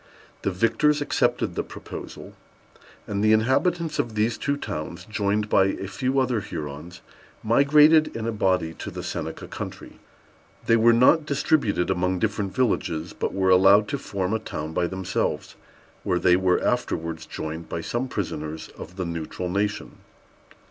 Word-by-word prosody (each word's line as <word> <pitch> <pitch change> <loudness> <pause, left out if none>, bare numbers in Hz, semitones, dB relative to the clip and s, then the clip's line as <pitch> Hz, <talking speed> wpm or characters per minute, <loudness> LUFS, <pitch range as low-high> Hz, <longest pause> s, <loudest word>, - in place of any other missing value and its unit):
The - - 0
victors 115 +10 +2
accepted 145 - 0
the - - -1
proposal; - - -9 0.7
and 100 0 -2
the 110 0 +5
inhabitants 155 +8 +1
of 115 -2 -1
these 110 +1 +1
two 140 0 -1
towns, 85 - -6
joined 105 0 -1
by 95 - +4
a 95 0 -2
few 130 +7 -1
other 125 -3 +1
Hurons, 80 0 -7 0.4
migrated 150 +6 +5
in 115 -1 -3
a 115 - 0
body 95 -6 0
to - - -5
the - - -7
Seneca - - -5
country. - - -8 0.7
They 115 - +4
were 115 +1 +5
not 130 +7 +4
distributed 140 - +1
among 90 0 0
different 100 -1 -2
villages, 95 -10 0
but - - -2
were 95 -1 +1
allowed 95 +3 +6
to - - -2
form 95 0 -3
a 110 - +1
town 80 -7 -6
by 85 - +1
themselves, 95 0 -2 0.5
where 90 - +1
they 90 0 +4
were 90 0 +2
afterwards 80 -1 -2
joined 80 +1 -6
by 85 - -3
some 120 +9 -2
prisoners 80 -8 -4
of 90 - -10
the 95 -1 -3
Neutral 85 +2 -4
Nation. 105 +3 -2
100 Hz, 155 wpm, -24 LUFS, 90-120 Hz, 0.7 s, allowed